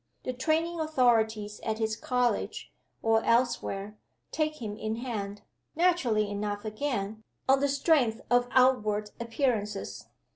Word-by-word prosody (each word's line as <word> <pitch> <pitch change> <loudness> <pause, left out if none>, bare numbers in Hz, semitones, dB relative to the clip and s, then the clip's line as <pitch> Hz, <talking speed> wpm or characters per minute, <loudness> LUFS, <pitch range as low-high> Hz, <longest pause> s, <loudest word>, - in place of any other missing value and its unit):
The 255 - -2
training 325 +6 0
authorities 225 -8 +2
at 220 -1 -2
his 220 -1 0
college, 250 0 -1 0.3
or 225 0 +3
elsewhere, 215 -4 0 0.3
take 310 -1 -1
him 210 -4 -4
in 215 +1 -3
hand 210 -4 -5 0.3
(naturally 290 - +2
enough 205 +1 -3
again) 215 -2 -3 0.2
on 270 0 +5
the 285 - +2
strength 275 -5 +2
of 245 0 +4
outward 215 -5 +3
appearances. 230 -3 -2
230 Hz, 120 wpm, -29 LUFS, 210-265 Hz, 0.3 s, on